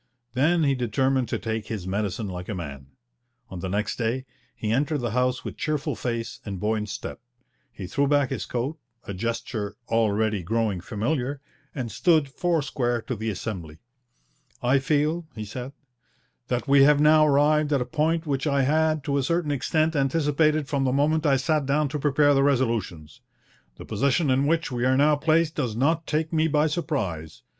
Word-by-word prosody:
Then 160 +6 +2
he 140 -2 +3
determined 130 +1 0
to - - -1
take 110 -1 -4
his 105 -5 -5
medicine 100 +2 -2
like 90 -1 -6
a 105 - -2
man. 70 -6 -7 0.6
On 95 - -7
the 95 - -4
next 105 +3 -1
day 125 +3 -1 0.3
he 110 - -3
entered 145 +6 +1
the 120 -5 -2
House 125 +1 0
with - - -6
cheerful 150 -2 -2
face 115 -2 -4
and 100 -3 -5
buoyant 105 +1 -1
step. 105 - -6 0.5
He 95 - -8
threw 140 +10 0
back 145 -2 +2
his - - -3
coat, 135 +6 -3 0.2
a 100 - -6
gesture 115 0 -3
already 110 -2 +1
growing 105 0 -1
familiar, 125 - -2 0.4
and 125 -5 -4
stood 160 -5 +2
four 165 +2 0
square 120 -4 -1
to 125 - -4
the 110 +1 -3
Assembly. 90 -6 -5 0.9
'I 130 +3 +4
feel,' 155 +4 0
he 110 -1 -5
said, 125 +5 -6 0.8
'that 125 +3 -2
we 140 0 +6
have 145 +1 +5
now 155 +1 +6
arrived 150 +1 +3
at 140 - +3
a 125 - -1
point 160 +3 0
which 140 -1 -1
I 140 -1 +2
had 155 +1 +2
to 140 0 0
a - - +1
certain 165 +2 0
extent 155 +3 0
anticipated 150 +1 +2
from 140 0 0
the 130 - +1
moment 150 +3 +2
I 135 -2 +4
sat 150 +1 0
down 145 +1 +1
to 150 +2 -3
prepare 145 0 +3
the 135 - +3
resolutions... 115 - -1 0.5
the - - -10
position 140 +2 +1
in 135 +2 +2
which 160 -1 0
we 120 -1 -2
are 130 +1 +3
now 150 +2 +4
placed 160 +2 +2
does 125 -9 -2
not 155 +7 +1
take 160 +1 -1
me 160 0 +3
by 150 -1 +2
surprise... 120 - -3
135 Hz, 185 wpm, -25 LUFS, 110-150 Hz, 0.9 s, we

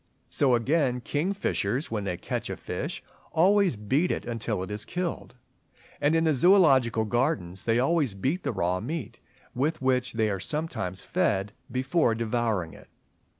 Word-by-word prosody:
So 130 -4 +3
again 125 0 +1
Kingfishers, 145 - -1
when 105 -3 -2
they 90 -2 -2
catch - - -4
a - - -4
fish, - - -5 0.3
always 190 - +4
beat 130 - +1
it - - -3
until 115 -4 -2
it 95 - -7
is 105 +1 -3
killed; 175 -4 -4 0.7
and 150 +3 +3
in 165 - +3
the 160 -2 +3
Zoological 135 - +4
Gardens 105 - -1
they 115 0 +2
always 135 - +1
beat 135 - -1
the - - -2
raw 90 -3 0
meat, 125 - -5 0.3
with 150 +6 0
which 130 -1 +1
they 110 -2 +1
are 100 - -2
sometimes 110 - -3
fed, 100 +1 0 0.2
before 130 0 +1
devouring 110 -6 -1
it. - - -15
125 Hz, 155 wpm, -27 LUFS, 105-155 Hz, 0.7 s, always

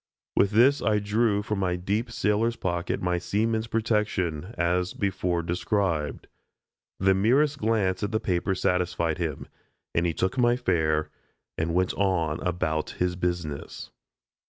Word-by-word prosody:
With 100 - +4
this 125 +7 +4
I 105 -1 +2
drew 105 0 +1
from 105 -1 -2
my 90 -2 0
deep 100 +7 -1
sailor's 115 +1 +1
pocket 85 -4 -2
my 90 -1 +1
seaman's 110 +4 0
protection, 105 -7 -1
as 90 +1 0
before 90 -3 -1
described. 85 -3 -1 0.7
The 95 0 +3
merest 135 +9 +2
glance 105 -4 +1
at 105 0 -2
the 110 - +1
paper 95 0 0
satisfied 90 -3 0
him, 80 -5 -3 0.5
and 85 +1 +2
he 85 - -1
took 95 +8 -1
my 120 0 +4
fare 80 -9 0 0.4
and 85 +1 -1
went 90 0 +2
on 85 -6 0
about 80 -3 -1
his 90 0 0
business. 85 -5 -4
95 Hz, 140 wpm, -26 LUFS, 85-105 Hz, 0.7 s, With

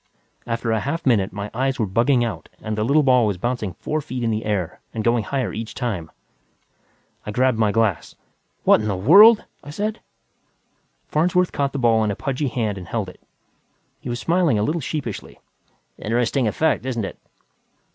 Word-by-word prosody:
After 115 0 -2
a 110 - +1
half 165 +8 -3
minute, 105 -7 +2
my 100 +2 -6
eyes 135 +2 0
were 115 - 0
bugging 120 +6 +2
out 115 - -5
and 110 -1 -4
the 105 - -1
little 145 +6 +3
ball 125 -4 +4
was 100 -3 -1
bouncing 115 -2 -2
four 155 - -3
feet 125 -3 -5
in 115 - +1
the 110 +1 -2
air 100 -6 -2 0.2
and 110 - -2
going 115 -1 +2
higher 135 0 -2
each 110 +1 -6
time. 100 -11 -3 1.1
I - - -7
grabbed 125 +2 +1
my 110 -2 +3
glass. 110 -5 0 0.5
"What - - +5
the 105 - -3
hell!" 205 - +8 0.3
I - - -11
said. 210 +8 -3 1.1
Farnsworth 180 +3 +1
caught 140 -1 -1
the - - -4
ball 115 -3 +3
in 105 - 0
a 100 - -2
pudgy 135 +2 -2
hand 110 -6 -2
and 90 - -10
held 110 -5 -3
it. - - -16 0.8
He - - -7
was 120 0 -3
smiling 170 -6 +2
a 105 - +1
little 160 +8 -1
sheepishly. 130 -6 -5 0.6
"Interesting 120 +3 0
effect, 150 +5 +1
isn't 120 -5 -2
it?" - - -8
120 Hz, 185 wpm, -22 LUFS, 110-140 Hz, 1.1 s, hell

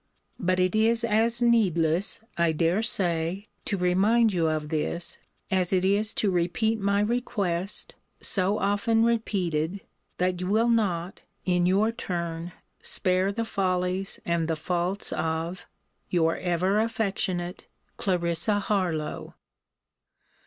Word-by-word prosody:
But 185 0 +1
it 185 +2 +2
is 225 +2 +3
as 230 +2 +2
needless, 185 -7 +2
I 170 -1 +2
dare 165 +6 +1
say, 180 -2 0 0.2
to 200 - -1
remind 200 +5 +3
you 170 -3 +1
of 155 -1 -2
this, 165 +2 -2 0.3
as 185 -2 +2
it 185 -1 +2
is 205 +3 +4
to 205 - +2
repeat 185 +6 0
my 200 0 +1
request, 205 -5 -1 0.3
so 195 +1 +2
often 205 +3 +2
repeated, 190 -6 -1 0.4
that 180 0 0
you 180 - -2
will 220 +4 +2
not, 190 -6 0 0.2
in 180 -1 +2
your 200 +5 +3
turn, 170 -6 -4 0.3
spare 185 +1 +1
the 230 +3 -2
follies 185 -1 -1
and 170 -1 0
the 165 - 0
faults 180 +5 -2
of 165 +3 -3 0.4
Your 165 -2 +2
ever 185 +3 +1
affectionate 195 -5 -2 0.3
CL. 175 -3 0 0.3
HARLOWE. 175 -7 -2
185 Hz, 125 wpm, -26 LUFS, 170-210 Hz, 0.4 s, is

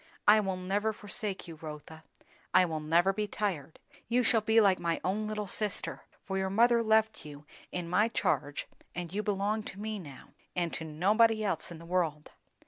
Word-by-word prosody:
"I 210 +1 +8
will 190 -3 -1
never 200 +4 -1
forsake 205 -2 -4
you, 165 -2 -10
Rotha. 155 0 -9 0.5
I 185 0 +7
will 160 -2 -3
never 170 +5 +3
be 210 +1 -2
tired. 170 -9 -3 0.3
You 245 +2 +2
shall 225 -1 +3
be 220 +1 +4
like 195 -4 +4
my 170 -1 -1
own 210 +3 -1
little 210 -1 -3
sister; 210 +2 -2 0.2
for 190 -1 -2
your 190 0 0
mother 235 +4 +4
left 220 -1 +2
you 150 -1 -11 0.3
in 175 -2 -3
my 205 +6 +3
charge, 145 -10 -1 0.3
and 175 0 -5
you 210 - 0
belong 210 +1 0
to 200 -2 -8
me 215 0 -4
now, 145 -7 -11 0.3
and 175 -2 -1
to - - -4
nobody 215 +8 +3
else 195 -2 0
in 170 - -8
the 165 - -12
world." 165 -4 -1
195 Hz, 190 wpm, -31 LUFS, 170-215 Hz, 0.5 s, I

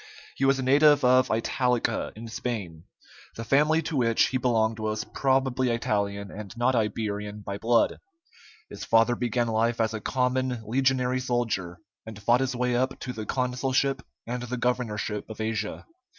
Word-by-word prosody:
He 135 - 0
was 135 0 +4
a 135 - -2
native 145 +1 +5
of 130 0 +4
Italica, 125 +2 0
in 115 +2 -8
Spain. 105 -8 -5 0.5
The 115 - -5
family 150 +6 +3
to 160 0 -4
which 115 -3 +3
he 130 - 0
belonged 115 -3 +1
was 110 0 -2
probably 130 -1 +1
Italian, 100 -4 -1
and 105 -2 -8
not 125 +2 +2
Iberian, 105 -2 -2
by 100 0 -5
blood. 115 +1 +2 0.7
His - - -9
father 115 +1 +3
began 120 0 0
life 115 +1 0
as 110 0 +1
a 110 - -4
common 125 -1 -1
legionary 130 +1 +1
soldier, 115 -9 -2 0.3
and 110 -2 -9
fought 120 +4 +3
his 130 -1 -1
way 125 0 0
up 130 +2 0
to 125 - -4
the 110 -2 -6
consulship 130 +1 0 0.2
and 120 +1 -4
the 125 +1 -4
governorship 115 -4 -2
of 110 - -9
Asia. 110 0 -3
120 Hz, 165 wpm, -26 LUFS, 110-130 Hz, 0.7 s, native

